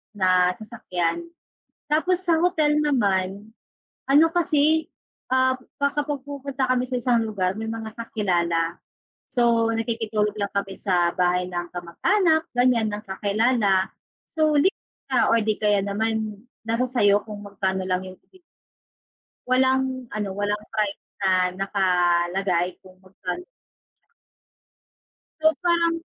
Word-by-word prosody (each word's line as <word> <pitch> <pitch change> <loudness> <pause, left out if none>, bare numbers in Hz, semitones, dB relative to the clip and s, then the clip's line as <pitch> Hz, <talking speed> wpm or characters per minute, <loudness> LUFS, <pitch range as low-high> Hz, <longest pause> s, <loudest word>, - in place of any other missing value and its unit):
na 185 -2 +3
sasakyan. 215 - -3 0.7
Tapos 360 +4 +1
sa 335 -2 +3
hotel 310 -4 +2
naman, 205 -7 0 0.6
ano 290 +4 +6
kasi, 320 -2 +2 0.5
ah, 260 0 +3 0.2
pa 280 - +3
kapag 290 -1 -2
pumupunta 275 -2 -3
kami 255 0 +2
sa 250 0 -2
isang 235 -1 +2
lugar 190 -3 -1
may 220 0 -4
mga 225 -1 -7
kakilala, 175 -7 -1 0.5
so, 235 -2 +2
nakikitulog 225 -2 -1
lang 200 -2 -3
kami 200 -1 -3
sa 180 -3 +1
bahay 180 0 +1
ng 175 -1 -4
kamag-anak, 315 - +1
ganyan 245 -3 +3
ng 205 - -4
kakilala, 200 0 +1 0.4
so, 310 -1 +1
nakikitulog 380 +6 0
or 230 - +5
di 215 0 +1
kaya 210 -2 +3
naman 215 0 -2 0.3
nasa 230 +2 +1
sa'yo 205 -5 +3
kung 210 -2 -7
magkano 190 -1 -2
lang 185 0 0
yung. 185 0 -11 1.3
Walang 260 0 +1
ano, 210 -1 -2
walang 205 0 -1
price 210 -2 -1 0.2
na 185 -1 +2
nakalagay 180 -1 +1
kung 185 -1 -17
magkan. 190 - -6 2.0
So, 315 0 +4
parang, 340 -1 +3
215 Hz, 120 wpm, -24 LUFS, 190-260 Hz, 2.0 s, ano